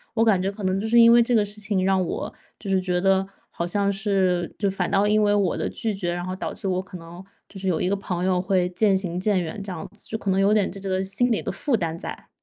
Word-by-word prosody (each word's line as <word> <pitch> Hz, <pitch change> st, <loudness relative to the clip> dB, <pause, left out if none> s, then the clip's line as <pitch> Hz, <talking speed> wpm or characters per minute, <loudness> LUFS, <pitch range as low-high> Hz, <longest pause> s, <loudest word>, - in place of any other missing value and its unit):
我 225 Hz, -, +3 dB
感 200 Hz, -5 st, +3 dB
觉 190 Hz, -, 0 dB
可 205 Hz, 0 st, -8 dB
能 185 Hz, 0 st, 0 dB
就 220 Hz, -, -2 dB
是 235 Hz, +2 st, +5 dB
因 230 Hz, 0 st, +8 dB
为 240 Hz, 0 st, +7 dB
这 235 Hz, +1 st, +2 dB
个 210 Hz, -2 st, +3 dB
事 205 Hz, +1 st, -6 dB
情 205 Hz, -3 st, 0 dB
让 190 Hz, -1 st, +2 dB
我， -, -, -4 dB, 0.2 s
就 210 Hz, -, -10 dB
是 190 Hz, -1 st, +2 dB
觉 180 Hz, -1 st, 0 dB
得 190 Hz, +1 st, +2 dB, 0.3 s
好 170 Hz, -, -3 dB
像 200 Hz, +2 st, +1 dB
是， 190 Hz, -3 st, 0 dB
就 205 Hz, -, 0 dB
反 195 Hz, -, -1 dB
倒 200 Hz, +1 st, +2 dB
因 215 Hz, +1 st, +3 dB
为 205 Hz, 0 st, +3 dB
我 200 Hz, -4 st, +1 dB
的 -, -, -2 dB
拒 225 Hz, -2 st, -2 dB
绝， 180 Hz, -3 st, -2 dB
然 175 Hz, 0 st, -4 dB
后 185 Hz, 0 st, -4 dB
导 190 Hz, -, -4 dB
致 200 Hz, -, -5 dB
我 185 Hz, -1 st, 0 dB
可 190 Hz, -1 st, -10 dB
能 170 Hz, +2 st, -11 dB, 0.2 s
就 195 Hz, -, -11 dB
是 190 Hz, -, -4 dB
有 175 Hz, -4 st, +1 dB
一 -, -, 0 dB
个 200 Hz, -, +1 dB
朋 180 Hz, -2 st, -3 dB
友 185 Hz, -1 st, +2 dB
会 185 Hz, -1 st, +1 dB
渐 195 Hz, +2 st, +2 dB
行 180 Hz, -2 st, -3 dB
渐 195 Hz, 0 st, +1 dB
远 175 Hz, +5 st, -5 dB
这 195 Hz, -, -6 dB
样 170 Hz, -3 st, -6 dB
子， 210 Hz, -, -9 dB
就 220 Hz, -, -3 dB
可 205 Hz, -, -4 dB
能 190 Hz, -, +1 dB
有 195 Hz, +1 st, +3 dB
点 210 Hz, -3 st, +2 dB
这 200 Hz, -, -9 dB
个 190 Hz, 0 st, 0 dB
心 220 Hz, +6 st, +1 dB
里 225 Hz, -, +1 dB
的 -, -, -3 dB
负 235 Hz, +6 st, 0 dB
担 165 Hz, -5 st, -2 dB
在。 -, -, -7 dB
195 Hz, 320 characters per minute, -24 LUFS, 185-205 Hz, 0.3 s, 因